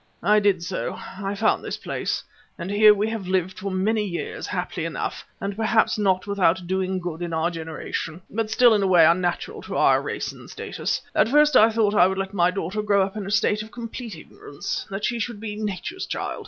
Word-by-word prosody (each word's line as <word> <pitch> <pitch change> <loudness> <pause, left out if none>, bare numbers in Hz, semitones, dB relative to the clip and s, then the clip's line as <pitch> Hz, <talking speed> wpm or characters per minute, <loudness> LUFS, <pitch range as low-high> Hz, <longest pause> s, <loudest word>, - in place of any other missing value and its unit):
I 210 +4 +5
did 200 -4 +2
so; 185 +2 -3 0.3
I 195 0 -2
found 215 +2 +1
this - - -4
place, - - -3 0.3
and 185 +2 -5
here 210 +1 +7
we 210 +1 +1
have 220 -5 -4
lived 185 0 -1
for 200 - -3
many 210 +3 +1
years, 175 -4 -4
happily - - -3
enough, - - -4 0.2
and 200 0 -3
perhaps 220 +1 +2
not 190 -3 +2
without 190 -3 +1
doing 190 +1 -1
good 175 -2 -5
in 170 -1 -3
our 160 +2 +1
generation, 160 0 -5
but 220 0 -2
still 235 +1 +5
in 210 - +2
a 195 - +2
way 175 -3 +6
unnatural 175 +1 +1
to - - -5
our - - +4
race - - -4
and - - -14
status. - - -3
At - - +3
first 295 +1 +5
I 220 -1 +7
thought 220 -2 +1
I 180 -3 +6
would 190 0 -2
let 195 +1 -3
my 175 -2 +3
daughter 190 +2 -3
grow 200 -2 +3
up 195 +2 -4
in 205 -2 -5
a - - -4
state 205 +1 +2
of 215 - -9
complete 230 -2 -7
ignorance, 145 -2 -6
that 195 +1 -3
she 240 0 -1
should 230 -2 -3
be 210 -1 -5
Nature's 210 - -4
child. - - -4
200 Hz, 220 wpm, -24 LUFS, 180-215 Hz, 0.3 s, here